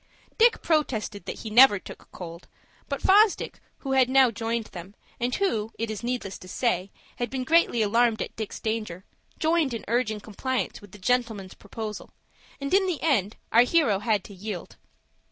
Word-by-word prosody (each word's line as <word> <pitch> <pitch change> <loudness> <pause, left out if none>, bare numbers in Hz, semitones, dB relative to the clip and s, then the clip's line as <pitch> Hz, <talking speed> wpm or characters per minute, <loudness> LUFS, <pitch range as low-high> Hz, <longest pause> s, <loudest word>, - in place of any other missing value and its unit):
Dick 465 +1 +4
protested 235 -10 -1
that - - -5
he 220 - -6
never 240 -1 +8
took - - -12
cold; 170 -1 -9 0.4
but 280 - -3
Fosdick, 410 +1 +4 0.2
who 270 - -4
had 260 -2 +4
now 260 -2 +5
joined 230 0 -2
them, 185 +3 -9 0.2
and 245 +1 0
who, 225 - 0
it 225 -1 -2
is 215 - -5
needless 240 -5 -4
to 185 - -12
say, 190 -2 -1 0.3
had 240 -1 -2
been 260 +1 -3
greatly 315 -6 +3
alarmed 230 +1 +2
at - - -5
Dick's 220 -2 -5
danger, 215 -5 -3 0.3
joined 315 -5 +1
in 225 - -7
urging 220 -2 0
compliance 240 +5 -3
with 205 -2 -15
the 210 - -12
gentleman's 220 -3 -1
proposal, 210 +1 -7 0.5
and 275 +3 -4
in 385 0 +4
the 350 -5 -1
end 225 - +1 0.2
our 230 - +7
hero 245 - +3
had 210 -3 0
to 205 - -12
yield. 195 -1 -7
230 Hz, 175 wpm, -26 LUFS, 205-265 Hz, 0.5 s, never